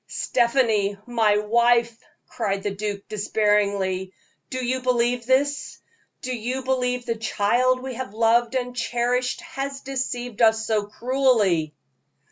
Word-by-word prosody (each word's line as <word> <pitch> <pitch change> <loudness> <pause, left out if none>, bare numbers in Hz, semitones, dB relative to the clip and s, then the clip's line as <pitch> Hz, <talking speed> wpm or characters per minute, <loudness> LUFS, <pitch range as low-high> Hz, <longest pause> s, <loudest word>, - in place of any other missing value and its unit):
"Stephanie, 230 -5 +1
my 225 -4 +2
wife," 235 +2 +2 0.3
cried 200 -4 -2
the 205 - -1
duke, 200 0 -5
despairingly, 200 -3 0 0.4
"do 255 -1 -3
you 255 +1 -1
believe 245 -1 0
this? 285 +2 +1 0.5
Do 255 0 -2
you 250 +3 -3
believe 250 -1 -1
the 235 - 0
child 240 +4 +1
we 265 -1 -5
have 240 -4 -6
loved 230 +2 +2
and 250 -1 -2
cherished 245 +5 -1
has 275 -5 -5
deceived 245 -3 -4
us 220 -1 +4
so 210 -2 0
cruelly?" 215 - +1
235 Hz, 125 wpm, -23 LUFS, 210-255 Hz, 0.5 s, us